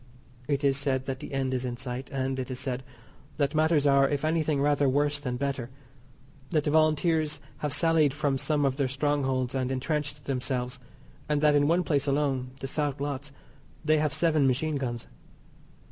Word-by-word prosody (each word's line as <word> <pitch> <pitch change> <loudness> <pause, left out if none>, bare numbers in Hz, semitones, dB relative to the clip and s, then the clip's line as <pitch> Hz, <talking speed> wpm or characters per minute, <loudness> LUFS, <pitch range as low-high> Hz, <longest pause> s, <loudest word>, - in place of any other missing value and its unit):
It 140 -1 0
is 135 -1 +3
said 135 -2 -1
that 135 -1 -4
the - - -8
end 135 -1 -1
is 130 -1 -1
in 120 -1 -3
sight; 125 +1 -5
and, 135 -1 -2
it 130 0 -4
is 125 -1 -4
said, 130 -2 -2 0.6
that 140 0 +1
matters 155 -1 +3
are, 140 -1 +5
if 145 +1 -1
anything 155 -2 +1
rather 145 -1 +3
worse 145 +2 +1
than 125 -4 -3
better. 135 -3 -2 0.8
That 155 -3 +1
the 150 - 0
Volunteers 155 -1 +2 0.2
have 150 - -3
sallied 155 0 +4
from 145 -2 -1
some 150 0 +1
of 135 -1 0
their 140 -2 +1
strongholds 135 -2 0
and 130 -1 -1
entrenched 145 +1 -2
themselves, 125 -2 -2 0.5
and 150 -1 +2
that 150 -1 +5
in 145 0 +4
one 175 +3 +3
place 145 -3 0
alone 135 -3 0
(the 135 - -3
South 145 0 -1
Lotts) 140 0 -4 0.5
they 155 0 +4
have 150 -1 +1
seven 155 -3 +3
machine 145 +4 0
guns. 120 -4 -4
140 Hz, 185 wpm, -28 LUFS, 130-150 Hz, 0.8 s, are